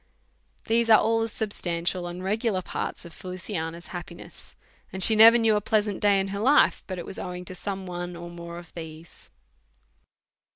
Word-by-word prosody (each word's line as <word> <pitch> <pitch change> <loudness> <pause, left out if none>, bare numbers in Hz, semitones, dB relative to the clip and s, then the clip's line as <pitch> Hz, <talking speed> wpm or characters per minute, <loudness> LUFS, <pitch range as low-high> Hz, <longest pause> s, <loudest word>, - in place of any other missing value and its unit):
These 230 0 +2
are 220 - +9
ail 225 +1 +2
the 225 - 0
substantial 180 -5 -2
and 175 +1 -7
regular 210 -1 0
parts - - -4
of 170 - -11
Feliciana's 175 -2 -6
happiness; 175 -1 -10 0.4
and 190 0 -2
she 220 - +3
never 225 +2 +9
new 225 -2 +3
a 210 - +1
pleasant 210 -1 0
day 205 -1 +4
in 195 0 -1
her 200 +1 -4
life, 270 +7 +4
but 185 - -5
it 175 - -6
was - - -8
owing 180 0 -6
to 185 - -7
some 190 +1 -5
one 175 -1 -5
or 170 0 -8
more 170 0 -8
of 175 -1 -12
these 160 -1 -9
things. - - -18
185 Hz, 190 wpm, -26 LUFS, 175-215 Hz, 0.4 s, are